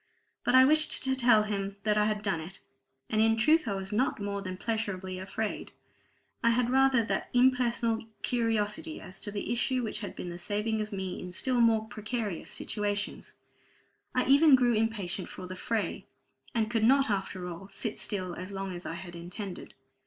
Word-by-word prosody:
But - - +3
I 260 0 +9
wished 310 +2 +2
to 265 -1 +1
tell 240 -4 +5
him 200 -2 -3
that 210 -1 +2
I 210 0 +3
had 210 -1 -1
done 195 -6 0
it; 180 +5 -8 0.5
and 215 - +1
in 225 0 +4
truth 305 +5 +4
I 200 - 0
was 195 +1 -4
not 250 +3 +1
more 200 0 -3
than 185 -1 -5
pleasurably 190 -4 -3
afraid; 205 +3 -4 0.7
I 235 - +5
had 240 +1 +2
rather 265 -2 +4
that 220 - -2
impersonal 240 -3 +2 0.2
curiosity 225 +4 -1
as 185 - -9
to - - -3
the 205 +3 -2
issue 250 +1 0
which 215 -2 -3
has 205 - -5
been 175 - -6
the 175 - -7
saving 210 +4 -1
of 215 +1 -4
me 190 -2 -4
in 180 - -7
still 250 +5 +1
more 225 -2 +4
precarious 215 -4 -4
situations. 205 -1 -3 0.8
I 255 - +2
even 280 +2 +7
grew 245 -2 +3
impatient 215 -5 -1
for 185 - -8
the 185 +1 -7
fray, 220 +3 -2 0.5
and 220 -1 +1
could 225 -2 +1
not 270 +1 +5
after 190 -2 -2
all 180 +2 -7
sit 215 +2 -3
still 185 -3 -1
as 185 +3 -7
long 195 -1 -4
as 175 - -7
I 165 - -4
had 175 0 -8
intended. 180 +3 -7
215 Hz, 190 wpm, -30 LUFS, 195-235 Hz, 0.8 s, I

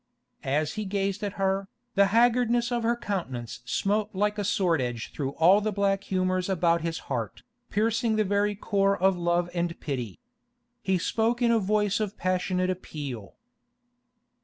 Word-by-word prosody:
As 150 +3 0
he 215 -1 -4
gazed 200 +1 -2
at 200 -1 -2
her, 195 0 0 0.3
the 200 0 +5
haggardness 240 +2 +3
of 240 -1 0
her 230 +1 +1
countenance 130 - -4
smote 205 - 0
like 210 +2 0
a - - 0
sword 180 -6 +1
edge 120 -2 -4
through 135 -2 -3
all 185 +7 +5
the 215 +1 -1
black 200 0 0
humours 185 0 0
about 170 -2 +2
his 165 0 -2
heart, 120 -5 -4 0.3
piercing 225 +2 +1
the 215 - +3
very 205 +1 +1
core 200 -1 +1
of 190 +1 +3
love 175 0 +1
and 170 -1 -2
pity. 125 - -4 0.6
He 190 -1 +1
spoke 225 +6 0
in 240 -2 +3
a 230 - +4
voice 210 0 +1
of 215 -1 -3
passionate 185 0 0
appeal. 140 - -6
195 Hz, 160 wpm, -27 LUFS, 170-210 Hz, 0.6 s, the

